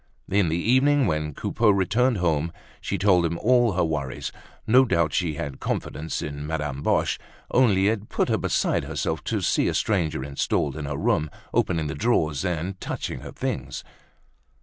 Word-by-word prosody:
In 100 -3 +3
the 80 - 0
evening, 130 +8 +3
when 75 -4 -1
Coupeau 115 -2 +1
returned 105 +5 +2
home, 85 -2 0 0.3
she 100 - -2
told 95 -2 +4
him 85 0 -1
all 120 0 +3
her 90 - +1
worries; 75 -5 -3 0.3
no 125 +4 +6
doubt 85 - +1
she 80 +2 0
had 70 -2 -5
confidence 80 +1 -3
in 75 0 -5
Madame 75 -3 -3
Boche, - - +1 0.3
only 100 -6 +4
it 110 -1 -1
put - - 0
her - - +1
beside - - 0
herself - - -2
to - - -1
see - - +2
a - - 0
stranger 85 -10 0
installed 70 0 -1
in 75 -2 -5
her 70 0 -3
room, 75 +2 +1 0.2
opening 80 -3 +1
the 75 - -3
drawers, 75 - +1
and 90 +1 -3
touching - - -4
her - - -9
things. 65 0 -4
85 Hz, 170 wpm, -25 LUFS, 75-105 Hz, 0.3 s, no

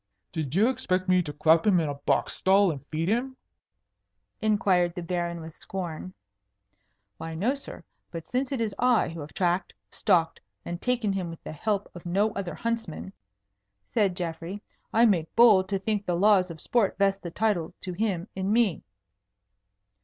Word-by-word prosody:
"Did 155 -2 -3
you 210 +5 +5
expect 190 -8 -1
me 185 0 +4
to 155 -4 -5
clap 160 +4 +3
him 190 -4 +5
in 160 - 0
a 145 - -2
box 140 0 0
stall 195 0 +4
and 145 -3 -7
feed 160 +1 -2
him?" 250 +5 -1 1.0
inquired 190 -5 +2
the 175 - -4
Baron 170 -1 -2
with 160 0 -9
scorn. 185 -1 -6 1.0
"Why, 165 0 -6
no, 215 +11 +1
sir. 280 - -9 0.3
But 165 -2 -7
since 255 +2 -1
it 270 - -1
is 220 -3 -1
I 250 -1 +3
who 165 0 -8
have 145 0 -8
tracked, 175 0 0 0.2
stalked, 165 -2 +1 0.2
and 175 0 -5
taken 240 -5 0
him 185 -3 -3
with 165 - -10
the - - -6
help 200 +6 -1
of 175 - -10
no 200 +5 +1
other 180 -5 -4
huntsman," 225 -3 -4 0.8
said 200 -5 +2
Geoffrey, 175 +3 -5 0.3
"I 230 +2 +5
make 175 -8 +1
bold 210 -6 +6
to 195 - +1
think 205 +1 -2
the 175 - +1
laws 190 0 +4
of 160 -2 -9
sport 230 -5 +1
vest 195 0 +2
the 170 - -5
title 180 -3 -1
to 185 - -5
him 190 -2 -1
in 190 +1 -1
me." 220 -6 +2
185 Hz, 175 wpm, -27 LUFS, 170-215 Hz, 1.0 s, bold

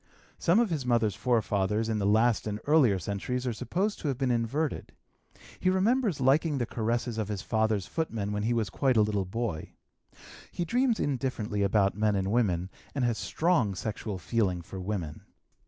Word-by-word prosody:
Some 175 +6 +4
of 235 -5 +2
his 150 -5 -1
mother's 115 -4 +2
forefathers 105 -1 0
in 110 -1 -1
the 100 - +1
last 110 +2 +3
and 105 0 -3
earlier 140 -10 +4
centuries 115 +7 -3
are 125 - -1
supposed 190 - -2
to - - -4
have 135 -3 -1
been 130 -2 0
inverted. 125 +6 -1 0.7
He 185 - +2
remembers 200 - +2
liking 140 +3 +3
the 120 - 0
caresses 115 +1 -2
of 110 - -1
his 105 -3 -4
father's 110 -3 0
footmen 115 -11 -3
when 105 0 -2
he 115 +3 +1
was 110 -4 -1
quite 130 0 +1
a 110 - +6
little 105 -2 0
boy. 100 -4 -4 0.8
He 175 - -3
dreams 245 +3 +1
indifferently 125 -6 -1
about 100 0 +3
men 105 0 +1
and 95 0 -1
women, 95 -6 +1 0.2
and 135 -3 +1
has 120 -2 0
strong 145 - +1
sexual 105 0 -4
feeling 95 -1 -1
for 95 +3 -8
women. 90 -6 -4
115 Hz, 180 wpm, -29 LUFS, 100-135 Hz, 0.8 s, a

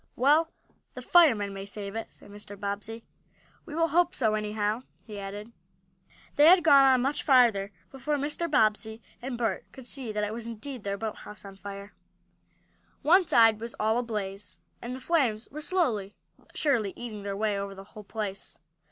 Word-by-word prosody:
"Well, 300 +6 +4 0.5
the - - -6
firemen 230 - +4
may 195 0 -7
save 200 0 -7
it," 225 - -5
said - - -16
Mr. 205 -1 -10
Bobbsey. 205 +3 -4 0.6
"We 300 - -7
will 330 0 +2
hope 350 +3 +2
so, 220 -8 +1
anyhow," 210 +1 -1 0.2
he 210 -3 -8
added. 205 +3 -7 0.9
They 295 - +7
had 345 +3 +10
not 350 - -5
gone 285 -4 +7
on 260 -2 +5
much 280 +2 -1
farther 235 -8 +4 0.2
before 270 +3 -2
Mr. 295 +4 -2
Bobbsey 220 -5 +1 0.2
and 250 0 -4
Bert 225 -5 -2
could 265 - -11
see 250 -3 -1
that 210 0 -2
it 210 +1 -2
was 230 0 -6
indeed 235 +1 -7
their 200 0 -2
boathouse 210 -1 -7
on 195 -1 -10
fire. 200 +1 -9 1.1
One 355 +3 +5
side 225 -2 +5
was 230 +1 -7
all 220 +2 +2
ablaze, 205 -4 -5 0.2
and 245 +1 -5
the - - -8
flames 255 -7 0
were 305 +3 -7
slowly, 245 - -1 0.2
but - - -18
surely, 235 -10 +1
eating 220 -4 -7
their 200 0 -4
way 210 -1 0
over 200 0 -5
the 195 - -10
whole 215 -2 -10
place. 205 -2 -5
225 Hz, 180 wpm, -28 LUFS, 205-270 Hz, 1.1 s, had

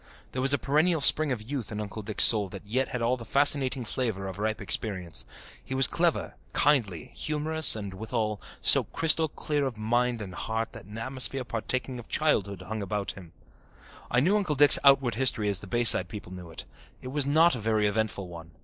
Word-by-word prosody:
There 130 - -4
was 135 +1 +1
a 145 - +2
perennial 155 +5 +1
spring 150 +1 +5
of 115 -4 -4
youth 130 -1 -6
in 105 - -5
Uncle 105 +1 -7
Dick's 105 0 0
soul 105 -4 +5
that 100 +1 -11
yet 130 +6 -1
had 125 -2 -5
all 125 +2 0
the 120 - -10
fascinating 135 0 +1
flavour 110 -5 -3
of 95 0 -8
ripe 110 +1 -2
experience. 95 -6 -1 0.4
He 130 - -6
was 135 0 +5
clever, 170 +5 -1 0.2
kindly, 110 - 0
humorous 155 0 +2
and, 100 -3 -7
withal, 110 0 -4 0.2
so - - +6
crystal 160 0 +3
clear 145 0 -3
of 120 -4 -7
mind 120 +2 -1
and 100 -4 -8
heart 110 +3 -5
that - - -10
an 105 +3 -11
atmosphere 130 +2 -1
partaking 125 +2 -4
of 115 - -12
childhood 100 - -1
hung 110 +3 -6
around 100 0 -4
him. 90 -4 -14 0.8
I 125 - +1
knew 190 +9 +2
Uncle 180 -8 -2
Dick's 145 +1 +6
outward 135 -4 +4
history 115 -3 +2
as 100 -2 +2
the 100 - -11
Bayside 120 +4 +5
people 105 -4 -10
knew 90 -2 -10
it. 80 - -8 0.4
It 130 - -7
was 140 0 -2
not 160 +1 +3
a - - -6
very 110 -1 -1
eventful 105 -2 -2
one. 85 -1 -11
115 Hz, 205 wpm, -26 LUFS, 105-135 Hz, 0.8 s, so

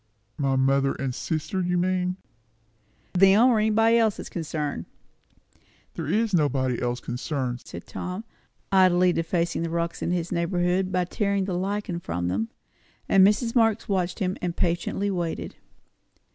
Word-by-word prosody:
"My 135 -2 +1
mother 135 +1 +2
and 135 -2 -3
sister, 160 - -2
you 180 0 0
mean?" 180 0 0 1.0
"Them, 195 +6 +6
or 230 -3 +3
anybody 225 +2 +4
else 220 -3 +2
that's - - -7
concerned." 150 - -4 1.1
"There - - -5
is 220 -1 +1
nobody 135 -6 +1
else 120 0 -1
concerned," 125 0 -3
said 85 - -8
Tom, 180 +4 -5 0.5
idly 185 -2 +5
defacing 170 0 -1
the 165 - -2
rocks 170 0 -2
in - - -1
his 175 -1 -1
neighbourhood 180 +1 0
by 180 -1 +1
tearing 200 +1 0
the 190 - -3
lichen 190 -1 -2
from 85 - -3
them. 105 +5 -1 0.6
And 195 -1 +6
Mrs. 210 +4 +3
Marx 225 -3 +2
watched 185 -3 -1
him, 185 -1 -1
and 175 -1 -3
patiently 180 +3 0
waited. 175 -3 -3
180 Hz, 145 wpm, -25 LUFS, 155-195 Hz, 1.1 s, Them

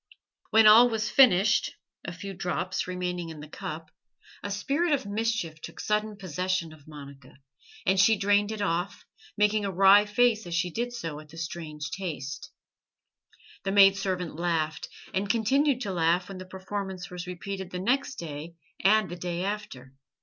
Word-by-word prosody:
When 220 0 +5
all 225 +3 +8
was 220 -2 -2
finished, 215 -6 +4 0.3
a 170 - -5
few 195 +3 -7
drops 180 0 -3
remaining 180 -2 -3
in 160 -2 -9
the 150 - -9
cup, 155 +1 -7 0.5
a 205 - -5
spirit 280 - 0
of 270 -3 0
mischief 205 -6 -2
took - - -10
sudden 210 0 -1
possession 185 -2 -2
of 150 -2 -18
Monica, 140 -3 -12 0.5
and 190 0 +2
she 220 +2 +5
drained 205 +1 +2
it 215 -2 -3
off, 175 +1 -2 0.3
making 210 0 +2
a 200 - -1
wry 195 +2 +6
face 220 -1 +2
as 170 - -3
she 175 +1 0
did 240 +6 -3
so 165 -11 -5
at 155 0 -14
the 165 - -13
strange 155 -2 -6
taste. 145 -8 -5 1.1
The 195 - -1
maid 195 -1 +7
servant 185 -4 -3
laughed, 160 -2 -2 0.2
and 195 +1 -1
continued 255 +4 +2
to 200 -5 -3
laugh 170 +2 +1
when 195 -1 -7
the 185 - -8
performance 190 0 -6
was 180 0 -7
repeated 190 +1 -6
the 180 - -5
next 260 +8 0
day 160 - -7 0.3
and 210 +1 +4
the 175 - -6
day 175 0 -4
after. 195 -11 -5
190 Hz, 170 wpm, -27 LUFS, 170-210 Hz, 1.1 s, all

